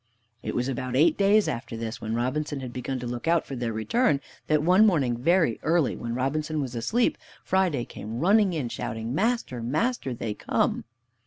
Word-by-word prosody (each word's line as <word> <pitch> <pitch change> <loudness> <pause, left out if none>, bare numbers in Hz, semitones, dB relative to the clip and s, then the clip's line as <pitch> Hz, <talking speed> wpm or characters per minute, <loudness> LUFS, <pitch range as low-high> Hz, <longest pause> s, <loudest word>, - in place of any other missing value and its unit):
It - - -4
was 125 +1 0
about 130 -1 -3
eight 155 +4 +5
days 205 +1 +4
after 115 -1 -4
this, 115 +1 -4
and - - -23
when 110 +1 -2
Robinson 145 +4 -1
had 125 -2 -6
begun 130 +1 -3
to - - -5
look 120 +4 -5
out 170 0 +3
for 135 - -6
their 120 -2 -2
return, 140 - +1 0.3
that 150 -1 +2
one 185 +5 +5
morning 145 - +3
very 155 0 +2
early, 165 -4 +2
when 115 0 -4
Robinson 150 +4 -1
was 130 -4 -3
asleep, 170 - +1 0.2
Friday 180 -10 +1
came 110 +2 -7
running 200 +4 +4
in, 150 -7 -2
shouting, 115 0 -4
"Master! 200 - 0
Master! 150 - -1
They 110 -2 -3
come." - - -1
135 Hz, 190 wpm, -26 LUFS, 120-170 Hz, 0.3 s, eight